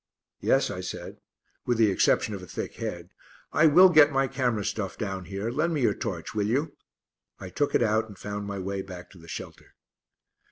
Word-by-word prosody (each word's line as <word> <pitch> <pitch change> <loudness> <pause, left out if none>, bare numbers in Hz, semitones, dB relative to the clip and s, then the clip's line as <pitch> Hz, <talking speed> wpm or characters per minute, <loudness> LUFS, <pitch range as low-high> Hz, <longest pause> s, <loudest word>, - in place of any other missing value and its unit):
"Yes," - - +2
I - - -5
said, - - -7 0.5
"with 120 -2 +2
the 110 -3 +4
exception 105 - +2
of 100 - -6
a 90 - -10
thick - - -6
head. - - -5 0.4
I 160 - +5
will 180 +5 +8
get 155 -3 +6
my 135 -1 +2
camera 125 -6 -1
stuff 105 -2 -3
down 95 -4 -4
here. 100 +5 -4
Lend 155 +6 0
me 145 - -1
your - - +3
torch, - - -5
will 105 -1 0
you?" 140 +6 -1 0.6
I 95 - -7
took 145 +9 -1
it - - +4
out 110 0 +1
and 100 -3 -13
found 105 +1 -5
my 100 -1 -4
way 95 +1 -3
back 90 -2 -10
to 95 - -15
the 85 - -15
shelter. - - -9
105 Hz, 205 wpm, -27 LUFS, 95-135 Hz, 0.6 s, will